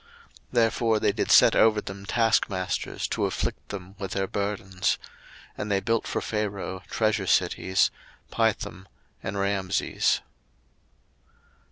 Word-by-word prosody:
02:001:011 - - -35
Therefore 115 -1 +2
they 105 - +2
did - - -2
set - - +7
over 110 -1 +5
them 100 -1 -8
taskmasters 110 -5 0
to - - -1
afflict - - -3
them 95 -2 -7
with 95 -3 -4
their 95 0 0
burdens. 95 -2 -1 0.6
And 105 - -4
they 100 -1 +2
built 115 +2 0
for - - -2
Pharaoh 100 -3 -3
treasure 110 -3 0
cities, 95 +1 +2 0.4
Pithom 95 +3 -1 0.3
and 95 - -4
Raamses. 100 -1 +1
100 Hz, 125 wpm, -26 LUFS, 95-110 Hz, 0.6 s, set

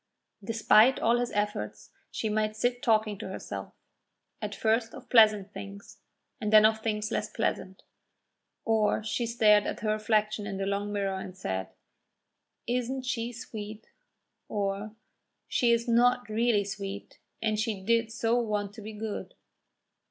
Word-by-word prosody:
Despite 225 +3 +4
all 235 +1 +3
his 245 0 -1
efforts, 105 - -3 0.2
she 220 - -3
might 215 0 0
sit 245 +2 0
talking 215 -4 +2
to - - -5
herself, 190 - -6 0.7
at - - -4
first 225 +1 0
of - - -13
pleasant 215 -4 +5
things 200 0 -10 0.4
and 210 -3 -2
then 215 0 +8
of 220 0 +3
things 215 0 -2
less - - -1
pleasant. 190 -4 -3 0.8
Or 220 -1 +2
she 230 +2 -1
stared 215 -3 +4
at - - -4
her 215 -1 0
reflection 215 -1 0
in 195 -2 -4
the 195 - -2
long 200 +1 -2
mirror 195 -2 -1
and 185 -1 -8
said: 95 - -3 1.0
"Isn't 250 +2 -2
she 235 -1 -2
sweet!" 220 -2 -8 0.6
or 205 +1 -2 0.5
"She 240 -2 +2
is 235 +1 +1
not 245 0 +3
really 220 -1 +2
sweet, 200 0 -7 0.2
and 215 -1 0
she 220 -2 -1
did 230 +3 +1
so 230 0 +1
want 210 -3 -2
to 220 - -10
be 215 +1 -8
good!" 215 0 -5
215 Hz, 150 wpm, -29 LUFS, 205-230 Hz, 1.0 s, then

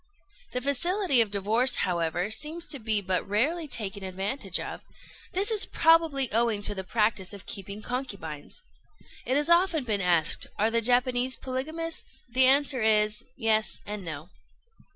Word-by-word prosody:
The 250 - -1
facility 280 - +2
of 220 - +1
divorce, 220 +6 +1
however, 175 +2 -1
seems 310 +8 -1
to 280 - -3
be 215 -2 +1
but 185 0 -1
rarely 300 +11 0
taken 200 -6 -2
advantage 195 +2 -2
of: - - -6 0.5
this 400 +4 0
is 430 -2 +4
probably 320 -6 +3
owing 225 -2 +2
to 205 - +1
the 190 -1 -5
practice 210 -1 -1
of 200 - -10
keeping 200 +1 -7
concubines. 205 - -6 0.6
It 260 - +2
has 295 +1 +1
often 340 -3 +3
been 215 -5 -1
asked, 170 -3 +2
Are 220 +2 +2
the 230 0 +2
Japanese 250 +2 +1
polygamists? 315 +6 -6
The 255 +2 +4
answer 275 -1 +3
is, 215 -1 +2
Yes 220 -3 +1
and 210 -1 -6
no. 155 -2 -7
230 Hz, 150 wpm, -27 LUFS, 200-275 Hz, 0.6 s, is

